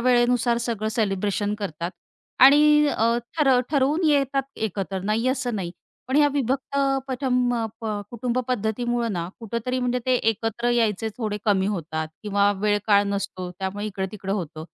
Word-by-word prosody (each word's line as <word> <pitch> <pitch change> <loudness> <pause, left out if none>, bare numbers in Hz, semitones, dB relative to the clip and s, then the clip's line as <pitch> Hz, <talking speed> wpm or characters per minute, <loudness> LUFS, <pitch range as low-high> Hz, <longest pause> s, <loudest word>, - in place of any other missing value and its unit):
वेळेनुसार 240 -1 +3
सगळं 215 -2 -1
सेलिब्रेशन 205 0 0
करतात. 170 -3 -4 0.5
आणि 295 +2 +7
अ, 230 -3 +2 0.2
ठर 270 -4 +5
ठरवून 295 +4 +2
येतात 275 -2 +2
एकत्र. 195 -2 -3
नाही 220 +5 0
असं 255 -3 -1
नाही. 175 -3 -3 0.4
पण 265 - +1
ह्या 295 -1 +5
विभक्त 275 0 -1 0.3
पथम 250 -2 +1 0.3
प - - -9 0.3
कुटुंब 240 +1 -2
पद्धतीमुळं 240 0 -1
ना, 170 -1 -3
कुठेतरी 235 +3 -3
म्हणजे 250 0 0
ते 255 - +3 0.2
एकत्र 225 +2 -2
यायचे 225 -2 +1
थोडे 215 -3 -2
कमी 195 -2 +2
होतात 160 -5 -3
किंवा 205 -1 +2
वेळकाळ 205 -1 +3
नसतो 190 -2 -3
त्यामुळे 195 +2 -3
इकड-तिकडं 195 0 -4
होतं. 160 -5 -4
225 Hz, 140 wpm, -24 LUFS, 200-250 Hz, 0.5 s, आणि